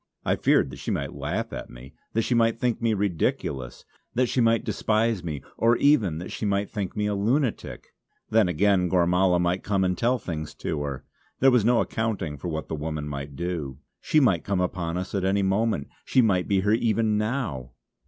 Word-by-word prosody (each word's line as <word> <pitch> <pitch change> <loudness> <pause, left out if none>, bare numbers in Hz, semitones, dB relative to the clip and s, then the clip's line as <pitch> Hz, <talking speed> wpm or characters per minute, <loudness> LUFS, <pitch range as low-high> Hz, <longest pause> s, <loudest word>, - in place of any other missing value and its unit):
I - - +2
feared 65 - +2
that - - -9
she - - -5
might - - -2
laugh 85 +12 -3
at - - -6
me; 60 +3 -12 0.2
that 115 - +1
she 125 - 0
might 115 -1 +2
think 120 -2 0
me 115 -2 +2
ridiculous; 80 -9 -2 0.3
that 125 +2 +3
she 125 +1 0
might 115 0 +3
despise 110 -3 0
me; 75 -5 -5
or 115 +1 +3
even 115 - +3
that 90 - -7
she - - -6
might 100 -1 0
think 100 -3 -4
me 105 - 0
a 105 - 0
lunatic! 115 +5 -1 0.4
Then 110 -3 +4
again 90 +1 +2
Gormala 90 +1 +3
might 90 +1 0
come 100 -2 0
and 90 -1 +1
tell 120 +5 +1
things 80 -8 -6
to 75 - -3
her. 70 -2 -5 0.3
There 135 +1 +6
was 125 -4 +4
no 120 +1 +4
accounting 105 -10 -2
for 90 - -5
what 80 -2 -4
the - - -5
woman 75 -1 -4
might 70 -1 -6
do. 80 -6 -4 0.2
She 155 - +2
might 95 - +3
come 100 -2 -1
upon 90 -2 -2
us 90 +1 -5
at 100 -2 -1
any 100 +1 +2
moment; 95 -5 0 0.2
she 130 - +3
might 95 -5 +2
be 100 -2 +2
here 105 +2 +1
even 110 -2 +1
now! 105 - -3
95 Hz, 205 wpm, -25 LUFS, 80-115 Hz, 0.4 s, There